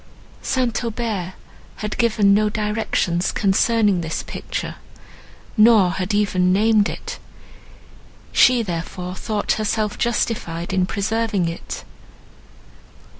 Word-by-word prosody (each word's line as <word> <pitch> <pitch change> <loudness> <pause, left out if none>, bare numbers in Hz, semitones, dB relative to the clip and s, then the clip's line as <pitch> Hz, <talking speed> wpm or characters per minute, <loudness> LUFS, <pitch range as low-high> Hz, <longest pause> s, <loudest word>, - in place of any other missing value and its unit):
St. 250 -3 -1
Aubert 220 -6 -3 0.4
had 210 0 -4
given 215 -4 +4
no 210 +1 +3
directions 210 -5 -1
concerning 205 -1 +2
this 160 -1 -3
picture, - - -5 0.8
nor 215 -5 +6
had 190 +2 -3
even 195 -3 +2
named 210 +1 +3
it; - - -7 1.1
she, 250 -2 +5
therefore, 180 0 -5
thought 205 +2 -2
herself 215 0 -1
justified 195 -7 -1
in 185 -1 +2
preserving 215 -2 0
it. 165 - -6
210 Hz, 100 wpm, -21 LUFS, 185-225 Hz, 1.1 s, nor